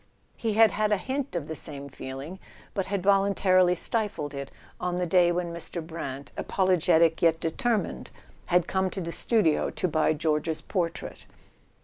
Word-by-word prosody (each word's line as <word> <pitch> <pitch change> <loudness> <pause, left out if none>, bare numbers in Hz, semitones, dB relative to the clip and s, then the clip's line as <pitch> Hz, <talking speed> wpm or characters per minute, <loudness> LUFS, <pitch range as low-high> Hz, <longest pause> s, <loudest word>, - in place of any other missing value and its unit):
He 225 -2 -1
had 220 0 +6
had 215 0 0
a 210 - +4
hint 265 +2 -3
of 160 -4 -3
the 160 - -4
same 140 -2 -7
feeling, 135 +6 -8 0.3
but 195 - -2
had 200 -2 -2
voluntarily 195 -2 +4
stifled 200 -7 -2
it, 140 -1 -5 0.3
on 180 0 -2
the 180 - 0
day 175 0 +4
when 175 -1 -2
Mr. 170 0 -6
Brant, 140 -4 -6
apologetic 170 -3 +2
yet 165 -1 +4
determined, 220 +7 -1 0.4
had 180 -1 +3
come 190 0 0
to 190 - -5
the 170 -1 -4
studio 185 -6 +2
to - - -2
buy 155 -1 +2
George's 155 0 -1
portrait. 170 -4 -4
175 Hz, 160 wpm, -27 LUFS, 160-195 Hz, 0.4 s, had